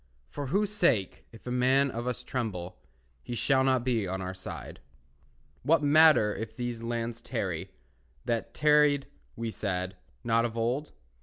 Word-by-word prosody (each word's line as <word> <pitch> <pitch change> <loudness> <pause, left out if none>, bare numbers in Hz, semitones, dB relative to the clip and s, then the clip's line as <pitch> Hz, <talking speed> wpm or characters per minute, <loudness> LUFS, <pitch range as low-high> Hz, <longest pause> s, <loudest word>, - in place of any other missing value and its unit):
For 145 -1 -4
whose 200 +8 +1
sake, 170 - +1
if 115 - -15
a 125 - -4
man 130 +2 +3
of 120 +2 -4
us 125 -3 -3
tremble, 95 -8 -4 0.4
He 120 - -6
shall 130 +3 +3
not 130 -2 +2
be 115 -6 0
on 95 +1 -3
our 95 0 -4
side. 95 0 -8 0.8
What 155 +3 +3
matter 145 -7 +6
if 110 +1 -6
these 120 -1 -4
lands 115 0 -3
tarry, - - -3 0.6
That 115 -1 -2
tarried 150 -2 +4 0.3
(we 115 0 -3
said) 95 -3 -3 0.3
not 115 -1 +2
of 115 -1 -3
old? 125 +6 -1
120 Hz, 155 wpm, -29 LUFS, 110-135 Hz, 0.8 s, matter